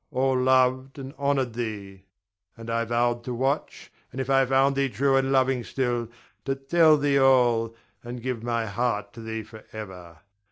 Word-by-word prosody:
All 135 -2 +1
loved 130 +1 +2
and 135 0 -8
honored 140 -4 0
thee; 100 -5 -6 0.5
and 115 0 -7
I 115 0 0
vowed 120 +1 0
to 125 - -3
watch, 135 +4 -2 0.2
and, 130 - -7
if 130 0 -2
I 135 0 +5
found 135 +1 +3
thee 135 0 +1
true 135 +4 +1
and 135 0 +1
loving 130 -2 +2
still, 120 -2 -2 0.4
to 135 0 -1
tell 155 +3 +4
thee 140 -1 +2
all, 120 -4 +3 0.3
and 120 +1 -7
give 125 -1 -4
my 115 -1 -1
heart 105 -2 -2
to 115 - -10
thee 110 0 -5
forever. 100 -6 -11
125 Hz, 170 wpm, -25 LUFS, 115-135 Hz, 0.5 s, I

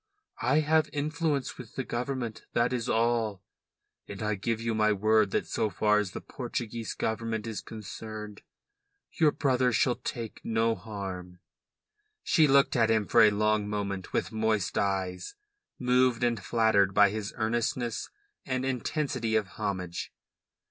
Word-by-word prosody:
I 145 +4 +3
have 155 +1 +2
influence 150 -1 -1
with 120 -3 -10
the 135 - -2
Government, 120 -2 -4
that 120 +1 +2
is 125 -1 -2
all; 115 -4 +1 0.6
and 100 +1 -6
I 105 0 +1
give 110 +3 -2
you 115 0 -1
my 110 -1 +3
word 110 0 +3
that - - 0
so 110 - -1
far 105 +1 +2
as 105 -3 -1
the - - -5
Portuguese 120 -3 -5
Government 110 0 -2
is 110 -2 -4
concerned 110 0 -8 0.7
your 155 -3 +3
brother 130 -4 +2
shall 125 +1 +2
take 115 -3 -6
no 115 0 +1
harm." 95 -5 -7 0.9
She 155 -3 +4
looked 140 0 +4
at 115 -3 +3
him 110 -2 +2
for 115 - +5
a 110 - +8
long 105 0 +1
moment 100 -2 -3
with - - -1
moist 110 -3 0
eyes, 95 - -1 0.4
moved 125 -1 +2
and 115 -4 +1
flattered 105 -4 +3
by 105 -1 +6
his 105 -1 -4
earnestness 115 +1 -1 0.3
and 130 -1 -2
intensity 130 -3 -1
of 105 -3 +1
homage. 90 -2 -4
110 Hz, 150 wpm, -29 LUFS, 105-125 Hz, 0.9 s, a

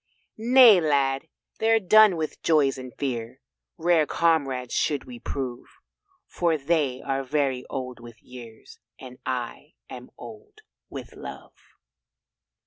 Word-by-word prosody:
"Nay, 235 -4 +7
Lad, 140 -1 0 0.3
they're 225 0 +3
done 215 -1 +5
with 155 -1 -5
joys 140 -4 +2
and 130 -1 -9
fears. 125 -3 -4 0.4
Rare 165 -2 +2
comrades 135 -7 0
should 145 -2 0
we 125 -2 -10
prove, 125 -2 -5 0.6
For 170 -2 0
they 145 -3 -1
are 135 0 -2
very 135 -2 -1
old 130 -3 -6
with 115 -1 -13
years 120 -3 -13 0.2
And 125 -1 -12
I 130 +4 -5 0.2
am 125 -1 -10
old 415 - -13 0.3
with - - -9
love." - - -10
140 Hz, 125 wpm, -25 LUFS, 125-170 Hz, 0.6 s, Nay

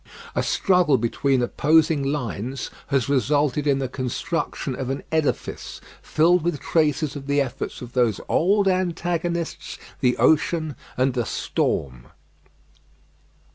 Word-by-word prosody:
A - - 0
struggle 180 -7 +3
between 125 +3 +1
opposing 155 +3 +3
lines 130 -2 -3 0.2
has 135 -4 +1
resulted 145 +1 +1
in 140 -1 +3
the 135 -1 -1
construction 135 +2 -3
of 130 0 -4
an 135 +1 -3
edifice, 160 -3 -2 0.2
filled 170 +3 +3
with 160 -3 -1
traces 155 -2 +1
of 140 -1 -7
the 140 0 +2
efforts 130 -2 -3
of 120 0 -10
those 120 -5 +2
old 195 +4 +3
antagonists, 175 -2 -1 0.2
the 125 -2 +2
ocean 160 -1 +2 0.2
and 130 +1 +2
the 120 -2 -1
storm. 65 -3 -2
145 Hz, 125 wpm, -23 LUFS, 130-165 Hz, 0.2 s, struggle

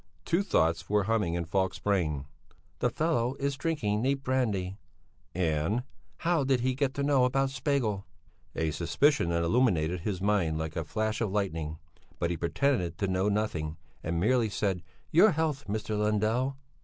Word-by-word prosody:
Two 170 +3 +2
thoughts 85 - +1
were 105 0 +3
humming 105 -5 +1
in 85 -1 -2
Falk's 95 +2 0
brain: 80 -9 0 0.5
"The - - +2
fellow 135 -6 0
is 140 0 -1
drinking 130 -8 -1
neat 135 +2 0
brandy" 105 -8 0 0.6
and 90 +6 0 0.3
"How 165 -3 +1
did 130 -2 +2
he 130 +1 +1
get 135 0 -1
to 140 - -1
know 140 -2 +4
about 135 +1 +2
Spegel?" 125 -8 -1 0.5
A 80 -1 0
suspicion 85 - +2
illuminated 85 -1 +2
his 95 +1 -3
mind 95 -6 +1
like 80 0 -4
a 85 - -1
flash 110 +7 -2
of 110 - +1
lightning, 80 -6 -2 0.4
but 85 - 0
he 85 - -2
pretended 90 - 0
to 100 - 0
know 95 +2 +1
nothing, 85 -7 -1 0.3
and 85 0 -1
merely 115 +3 +3
said: 100 -3 -1 0.3
"Your 200 +6 +6
health, 150 -4 -1
Mr. 110 +1 -2
Lundell!" 110 +6 +1
105 Hz, 160 wpm, -29 LUFS, 85-130 Hz, 0.6 s, Your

